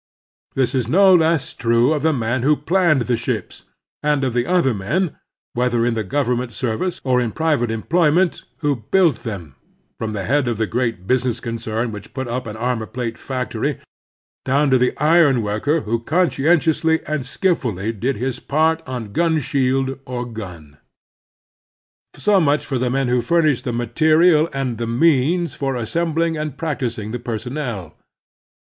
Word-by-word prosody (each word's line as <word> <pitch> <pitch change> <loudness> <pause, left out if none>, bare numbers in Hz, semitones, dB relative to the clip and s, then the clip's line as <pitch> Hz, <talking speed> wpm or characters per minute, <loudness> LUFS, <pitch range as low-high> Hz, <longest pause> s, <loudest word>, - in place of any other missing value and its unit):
This 130 -2 +1
is 125 -4 0
no 190 +7 +5
less 165 -3 +2
true 115 +4 +2
of 150 - -1
the 160 +2 +3
man 120 -2 -1
who 150 +4 +3
planned 165 -1 +2
the 120 +1 0
ships - - -4 0.4
and 150 -2 +1
of 130 -3 0
the 120 0 0
other 175 -8 +2
men, 150 - -1 0.4
whether 120 -1 +1
in 120 - +1
the 110 -1 -2
government 125 +1 -1
service 130 - -2
or 125 -2 +2
in 120 -2 -1
private 150 -6 0
employment, 165 +9 +1 0.2
who 145 -3 +1
built 175 -10 +4
them, 95 - -7 0.5
from 110 -1 -3
the 100 -2 -3
head 135 +3 +1
of 120 -3 -1
the 110 - +1
great 115 -4 -2
business 125 +1 0
concern 115 0 -3
which 105 -2 -10
put 130 -2 -3
up 125 +1 -3
an 105 0 -6
armor 120 -1 -2
plate 120 -1 -4
factory 130 -3 -3 0.7
down 140 +2 +2
to 130 - +5
the 125 - +1
iron 150 -5 +4
worker 110 +10 0
who 115 0 -1
conscientiously 160 +2 +2
and 155 -2 -2
skilftdly 115 - -1
did 130 +5 0
his 130 +2 -3
part 160 +3 +1
on 120 -5 -5
gun 165 +4 +2
shield 135 0 0
or 125 -1 -4
gun. 90 -11 -9 1.4
So 205 -2 +3
much 145 -1 +2
for 130 -3 -2
the 125 0 0
men 135 +1 0
who 125 0 +2
furnished 155 0 +1
the 125 - -1
material 155 +7 +3
and 130 -4 -3
the 115 - -2
means 160 +6 +2
for 135 -2 -2
assembling 165 +6 -1
and 150 -3 -4
practising 120 -9 -3
the 120 - -4
personnel. 115 - -5
130 Hz, 165 wpm, -20 LUFS, 115-155 Hz, 1.4 s, no